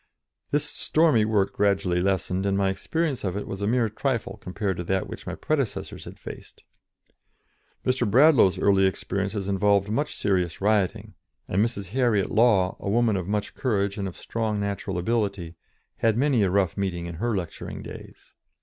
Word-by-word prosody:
This 145 0 +1
stormy 150 -11 +2
work 105 -3 +1
gradually 95 -3 +1
lessened, 95 0 0
and 100 0 +1
my 95 -1 +2
experience 150 - -2
of 95 -1 -2
it 105 - -5
was 95 0 -5
a 100 - 0
mere 120 0 +2
trifle 115 +1 -2
compared 95 0 -3
to 90 - -3
that 95 +2 0
which - - -9
my - - -3
predecessors 140 -7 -2
had - - -10
faced. - - -11 1.2
Mr. 125 -3 +1
Bradlaugh's 125 - +5
early 95 0 +4
experiences 100 +1 -3
involved 100 0 +2
much 145 +7 -1
serious 90 -5 0
rioting, 100 -2 0 0.3
and 100 +4 +2
Mrs. 100 -5 -3
Harriet 115 -4 +1
Law, 105 -5 +3
a - - -4
woman 115 0 +2
of 95 -2 -3
much 105 0 -2
courage 100 -5 0
and 100 - -2
of 95 - -8
strong 110 -2 -2
natural 100 -2 -3
ability, 100 -4 -1 0.4
had 115 -1 +2
many 135 -3 +3
a 100 - +3
rough 95 -3 +1
meeting 90 -4 -2
in 85 - -5
her 120 -3 0
lecturing 90 -3 -6
days. - - -11
100 Hz, 170 wpm, -25 LUFS, 95-115 Hz, 1.2 s, Bradlaugh's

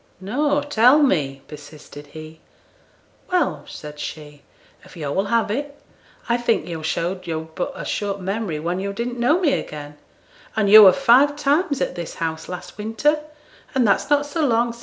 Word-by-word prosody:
'No; 285 +9 0
tell 260 -1 +5
me,' 140 - 0
persisted 145 -1 -12
he. 155 +1 -11 0.9
'Well,' 355 -6 0
said 150 -1 -10
she, 150 -1 -8 0.4
'if - - -15
yo' 150 -3 -4
will 195 +6 0
have 225 0 0
it, 285 +4 -4 0.5
I 235 - +2
think 230 -9 0
yo' 165 -2 -5
showed 175 +4 -3
yo'd 160 -1 -5
but 280 - -3
a - - -7
short 200 -1 -3
memory 190 -4 -3
when 175 +4 -2
yo' 200 +1 -3
didn't 240 +3 -4
know 295 +9 +3
me 310 -7 +2
again, 150 -1 -5 0.6
and 205 -2 +1
yo' 215 -1 +11
were 190 - +9
five 275 +3 +4
times 290 0 0
at - - -1
this 175 -2 -7
house 160 -1 -4
last 180 +3 -8
winter, 225 +8 +1 0.6
and 250 -4 +3
that's 200 - +1
not 290 0 +3
so 315 +2 -2
long 235 -3 +1
sin'. 235 - -15
205 Hz, 180 wpm, -21 LUFS, -, 0.9 s, yo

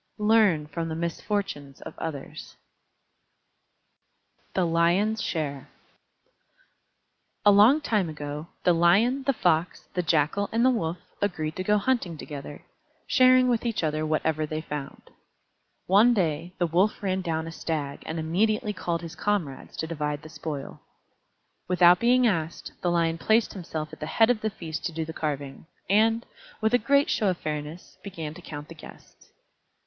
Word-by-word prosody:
Learn 210 -7 +3
from 165 +2 -4
the 160 - -3
misfortunes 170 -4 -3
of - - -8
others. 145 -4 -7 2.0
THE 185 - +2
LION'S 175 +7 +2
SHARE 145 -7 -3 1.8
A 205 - +8
long 220 +10 +6
time 210 - 0
ago, 150 0 -6 0.2
the 180 - +4
Lion, 200 +11 +3
the 275 - +4
Fox, 175 -6 0
the 180 - 0
Jackal, 165 +4 +1
and 230 +2 +2
the 260 - +6
Wolf 175 -8 -1 0.2
agreed 155 -6 -2
to 185 - -2
go 210 +2 +3
hunting 205 -7 0
together, 145 -1 -8 0.4
sharing 255 0 +5
with 240 -2 +1
each 230 -6 -1
other 155 0 0
whatever 155 0 0
they 155 +1 -3
found. 145 -3 -7 0.7
One 215 +6 +5
day 170 -2 -1
the 175 - +1
Wolf 180 +6 +1
ran 190 -1 0
down 160 -3 -2
a 165 - -6
Stag 150 -4 -4
and 160 - -4
immediately 210 +7 0
called 170 -3 -3
his 165 0 -7
comrades 185 -9 -2
to - - -2
divide 150 -2 -3
the 155 - -10
spoil. 155 -3 -6 0.9
Without 180 -1 +6
being 250 +2 +4
asked, 165 -7 -1
the 175 - +1
Lion 165 -1 +1
placed 220 +4 +2
himself 160 -5 -6
at - - -10
the 155 - -5
head 225 +6 +4
of 225 -3 -1
the 220 - 0
feast 160 -6 -6
to 175 - -1
do 160 0 -3
the 160 - -7
carving, 145 -2 -4 0.2
and, 225 +3 +3 0.3
with 220 +2 +1
a 245 - +5
great 280 +6 +3
show 215 - +1
of 180 - -1
fairness, 150 +2 -6
began 165 -6 -6
to - - -12
count 145 -1 -8
the - - -10
guests. 155 - -15
170 Hz, 160 wpm, -26 LUFS, 155-210 Hz, 2.0 s, A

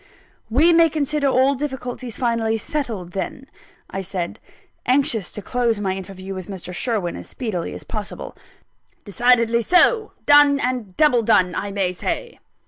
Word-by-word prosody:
"We 305 +9 +4
may 335 0 +6
consider 300 -1 0
all 265 +1 +3
difficulties 255 -4 -5
finally 230 -2 0
settled 220 - -4
then," 260 +8 -5 0.4
I 195 - -5
said, 185 -2 -4 0.5
anxious 250 -6 +2
to 210 - -7
close 235 0 0
my 190 -2 -1
interview 190 0 -7
with 185 -2 -7
Mr. 185 -2 -7
Sherwin 205 -4 -1
as - - -9
speedily 205 -9 -4
as - - -8
possible. 210 -2 -6 0.7
"Decidedly 235 +2 +3
so. 365 - +3
Done, 290 -1 +6
and 245 -8 -2
double 275 -6 +4
done, 200 -5 +3
I 200 0 -3
may 195 -2 0
say. 475 - -4
230 Hz, 145 wpm, -21 LUFS, 195-275 Hz, 0.7 s, may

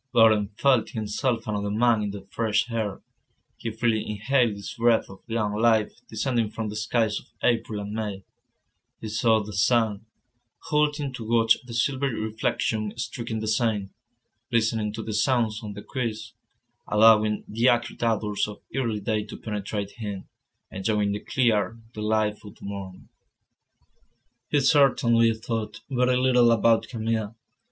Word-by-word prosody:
Laurent 110 -2 +4
felt 130 -5 +3
himself 115 +2 -2
another 105 -1 -2
man 115 +1 +3
in 105 - -2
the 100 -1 -8
fresh 115 +1 0
air; 110 -4 -3 0.5
he - - -4
freely 115 -2 0
inhaled 110 +2 +1
this 100 - -7
breath 115 -1 +2
of 95 - -12
young 110 -2 -1
life 110 0 +2 0.2
descending 115 0 0
from 110 0 -4
the 105 - -6
skies 110 0 0
of - - -19 0.2
April 115 -3 +1
and 105 0 -5
May; 105 -3 -4 0.8
he 110 - -6
sought 110 -1 +2
the 105 - -8
sun, 110 0 +1 0.6
halting 150 -2 +1
to 120 - -6
watch 115 0 +4
the 120 - -8
silvery 130 +1 0
reflection 110 0 -1
streaking 115 -2 -4
the 110 - -3
Seine, 110 -3 0 0.6
listening 110 -2 +1
to 110 0 -5
the 110 - -4
sounds 115 -1 +1
on 105 -2 -6
the 105 - -9
quays, 115 -3 -4 0.5
allowing 105 0 +5
the 115 +4 +2
acrid 120 0 0
odours 105 -3 0
of 105 - -10
early 115 -5 -1
day 105 0 -1
to - - -9
penetrate 105 -1 -4
him, 105 -4 -6 0.4
enjoying 105 +1 0
the 100 - -2
clear, 115 -3 +1 0.2
delightful 105 -1 -1
morn. 100 -2 -8 1.4
He 145 - +2
certainly 125 -5 +4
thought 110 -1 -4
very 125 0 +2
little 125 -2 +4
about 115 0 +3
Camille. 115 -2 -2
110 Hz, 145 wpm, -25 LUFS, 105-120 Hz, 1.4 s, allowing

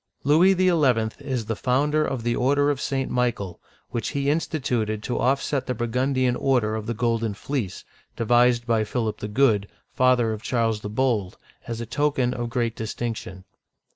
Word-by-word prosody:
Louis 165 +7 +5
XL 180 -4 +3 0.4
is 130 -5 -3
the 110 - -2
founder 145 +6 +1
of 130 -6 -3
the 120 0 0
order 145 +3 +2
of 140 - -3
St. 135 -1 -2
Michael, 115 -8 -1 0.3
which 115 -3 -2
he 140 -1 0
instituted 125 -9 -1
to 125 - -2
offset 135 +1 0
the 125 - -1
Burgundian 125 +2 0
order 125 -5 +1
of 110 0 -4
the 120 - -2
Golden 115 -2 0
Fleece, 110 -6 -4 0.3
devised 120 +1 +3
by 115 -2 +2
Philip 110 0 -2
the 105 - -4
Good, 105 -3 +2 0.3
father 125 -3 +3
of 110 - -6
Charles 115 -3 0
the 105 - -5
Bold, 110 -5 0 0.3
as 115 0 -4
a - - -4
token 135 -3 0
of 120 -1 -3
great 115 -1 -1
distinction. 110 -4 -5
120 Hz, 170 wpm, -24 LUFS, 110-135 Hz, 0.4 s, Louis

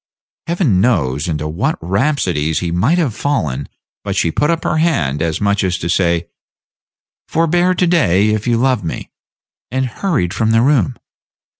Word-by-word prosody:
Heaven 165 - +1
knows 75 - +1
into 75 -2 -2
what 75 +2 -1
rhapsodies 90 - 0
he 85 -2 -2
might 110 - +2
have 150 -10 0
fallen, 75 - -2 0.3
but - - -3
she 85 - +1
put 150 - 0
up 165 -1 0
her 155 - 0
hand, 80 - 0
as 80 -2 -1
much 100 0 +1
as 90 -1 0
to 85 - -4
say, 85 -2 +1 1.0
"Forbear 175 +3 +2
to 180 - +2
day, 110 - +3
if 110 +1 -1
you 120 -1 +2
love 125 -3 +1
me," 80 - -5 0.6
and 130 +2 -1
hurried 125 - -1
from 110 +1 0
the 115 +1 +3
room. 135 -2 +2
110 Hz, 165 wpm, -17 LUFS, -, 1.0 s, day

